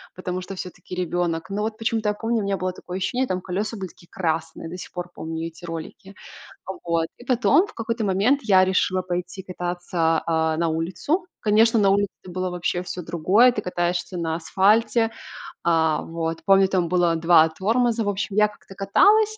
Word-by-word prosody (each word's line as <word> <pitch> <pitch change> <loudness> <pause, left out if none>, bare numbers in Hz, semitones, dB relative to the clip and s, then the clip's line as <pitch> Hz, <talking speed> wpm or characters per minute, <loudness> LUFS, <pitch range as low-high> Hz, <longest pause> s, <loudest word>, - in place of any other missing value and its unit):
потому 185 0 -4
что 195 +2 -7
всё-таки 180 0 -8
ребёнок. 175 -2 -1
Но, 200 +1 -2
вот, 220 0 -3
почему-то 225 -2 0
я - - +1
помню, 225 +2 -1
у - - -2
меня 195 -1 -1
было 185 0 -2
такое 180 0 -7
ощущение, 250 +7 -1
там 185 0 -2
колеса 205 +5 -3
были 190 -1 -4
такие 175 0 -19
красные. 165 -1 -3
До 180 - -7
сих - - -9
пор 175 0 -5
помню 160 0 -5
эти 165 +1 -11
ролики. 165 +4 -8 0.7
Вот, 165 -1 +1
и 245 - -13
потом 265 - +4
в 430 - -13
какой-то 230 -1 -2
момент 205 +9 +2
я 190 -4 +5
решила 185 0 +1
пойти 180 +1 -4
кататься, 175 -2 -1
а, 160 -1 +1
на 165 0 +1
улицу. 180 - -1 0.2
Конечно, 225 +2 +4
на 195 -1 +4
улице 200 0 +2 0.2
было 185 +1 -3
вообще 175 0 -2
всё 180 0 -6
другое, 185 +9 +3
ты 210 - -2
катаешься 175 0 -2
на 165 -2 -1
асфальте. 215 +6 +2 0.5
А, 160 -2 +2
вот, 165 0 -4
помню, 195 -1 +5
там 185 -3 0
было 175 -2 +2
2 165 -1 +5
тормоза, 225 +7 +1
в 205 - -4
общем, 200 +1 -3
я 210 - +6
как-то 205 -2 -15
каталась, 415 - +4
185 Hz, 190 wpm, -23 LUFS, 170-210 Hz, 0.7 s, я